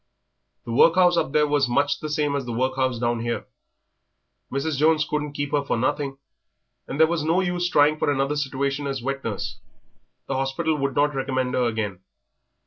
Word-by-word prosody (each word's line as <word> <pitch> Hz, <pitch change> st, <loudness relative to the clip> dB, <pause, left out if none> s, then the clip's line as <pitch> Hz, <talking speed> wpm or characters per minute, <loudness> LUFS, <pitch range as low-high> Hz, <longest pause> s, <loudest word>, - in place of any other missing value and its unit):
The 115 Hz, -, -5 dB
workhouse 175 Hz, +8 st, +5 dB
up 150 Hz, -, 0 dB
there 150 Hz, 0 st, +3 dB
was 145 Hz, -3 st, +1 dB
much 120 Hz, -, +1 dB
the 155 Hz, -, -5 dB
same 150 Hz, -1 st, 0 dB
as 135 Hz, -3 st, -3 dB
the -, -, -3 dB
workhouse 130 Hz, +1 st, 0 dB
down 120 Hz, 0 st, 0 dB
here. 120 Hz, 0 st, -3 dB, 1.1 s
Mrs. 145 Hz, +3 st, -1 dB
Jones 155 Hz, +1 st, +3 dB
couldn't 150 Hz, -1 st, -2 dB
keep 145 Hz, 0 st, -3 dB
her 145 Hz, -1 st, +1 dB
for 140 Hz, -, -1 dB
nothing, 135 Hz, +2 st, -1 dB, 0.7 s
and 140 Hz, -, -5 dB
there 160 Hz, -, +8 dB
was 165 Hz, 0 st, -1 dB
no 165 Hz, +4 st, +2 dB
use 175 Hz, -1 st, 0 dB
trying 150 Hz, -1 st, +4 dB
for -, -, +1 dB
another 140 Hz, +1 st, 0 dB
situation 140 Hz, 0 st, -2 dB
as 135 Hz, -3 st, -3 dB
wet 135 Hz, +1 st, -3 dB
nurse; 105 Hz, -4 st, -4 dB, 0.7 s
the -, -, -3 dB
hospital 135 Hz, +5 st, 0 dB
would 140 Hz, -1 st, -1 dB
not 145 Hz, +1 st, +2 dB
recommend 130 Hz, -1 st, -1 dB
her 125 Hz, -, +2 dB
again.... 105 Hz, -5 st, -3 dB
140 Hz, 185 wpm, -24 LUFS, 130-150 Hz, 1.1 s, there